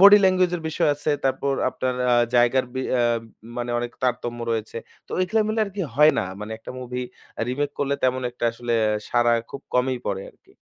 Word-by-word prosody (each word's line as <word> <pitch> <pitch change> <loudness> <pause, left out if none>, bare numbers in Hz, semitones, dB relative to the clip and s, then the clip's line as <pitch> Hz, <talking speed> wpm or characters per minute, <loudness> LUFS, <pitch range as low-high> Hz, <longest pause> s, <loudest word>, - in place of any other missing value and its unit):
Body 200 +1 +10
language 185 -1 +4
এর 165 - -8
বিষয় 160 - +1
আছে। 145 +1 -2
তারপর 135 +1 +1 0.2
আপনার 130 0 -2 0.2
আ - - +6 0.2
জায়গার 120 +2 +4
বি 130 - -1
অ্যাম 120 -2 +2 0.4
মানে 120 0 -2
অনেক 120 0 -3
তারতম্য 120 -1 -1
রয়েছে। 110 -1 -2 0.3
তো - - -29
ঐখা 200 +5 +2
মিলে 220 +1 0
আরকি 200 -1 -4
হয় 150 +3 +7
না। - - +1 0.2
মানে 105 +1 -5
একটা - - -9
মুভি 125 0 -4 0.3
অ্যা - - -3
রিমেক 145 +3 -1
করলে 140 0 +1
তেমন 130 0 +1
একটা 120 - -5
আসলে 120 0 -4
অ্যা 105 0 +2
সাড়া 120 -1 +3 0.2
খুব 140 - -7
কমই 125 0 +2
পড়ে 95 -1 -1
আরকি। - - -27
125 Hz, 200 wpm, -24 LUFS, 120-150 Hz, 0.4 s, Body